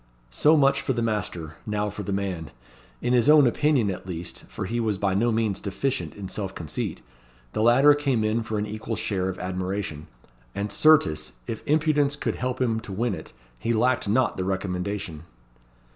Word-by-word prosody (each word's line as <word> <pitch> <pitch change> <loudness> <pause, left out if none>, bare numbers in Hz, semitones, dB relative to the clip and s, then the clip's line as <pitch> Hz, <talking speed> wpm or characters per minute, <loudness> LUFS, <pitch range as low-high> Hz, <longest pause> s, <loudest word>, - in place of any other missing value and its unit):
So 150 - +4
much 140 -1 +4
for 130 - 0
the 120 -1 -1
master: 90 -8 -3
now 105 -1 -1
for 105 - -6
the 100 - -4
man. 95 -5 -2 0.5
In 125 - +1
his 125 +3 +4
own 150 -2 +8
opinion, 125 -4 +2
at 95 - -7
least 85 -1 -6
for - - -5
he 120 +5 -2
was 110 -4 0
by 95 -1 0
no 115 +5 +2
means 110 -3 0
deficient 100 - -2
in 100 -2 -6
self 95 0 -4
conceit 80 -4 -4 0.5
the - - -1
latter 130 +6 +6
came 140 -6 0
in 110 +2 +1
for 110 -1 -3
an 105 - -1
equal 110 +2 -4
share 95 -4 -1
of 95 - -5
admiration; 90 -4 -4 0.5
and 100 0 -2
certes, 150 - +4
if 110 - -5
impudence 150 -1 +2
could - - -2
help 125 0 -2
him 115 -3 +1
to 110 - -9
win 110 +3 0
it, 80 -3 -8 0.3
he 115 - 0
lacked 120 -1 +2
not 125 +4 +2
the 95 - -1
recommendation. 95 -2 -3
105 Hz, 190 wpm, -25 LUFS, 95-125 Hz, 0.5 s, own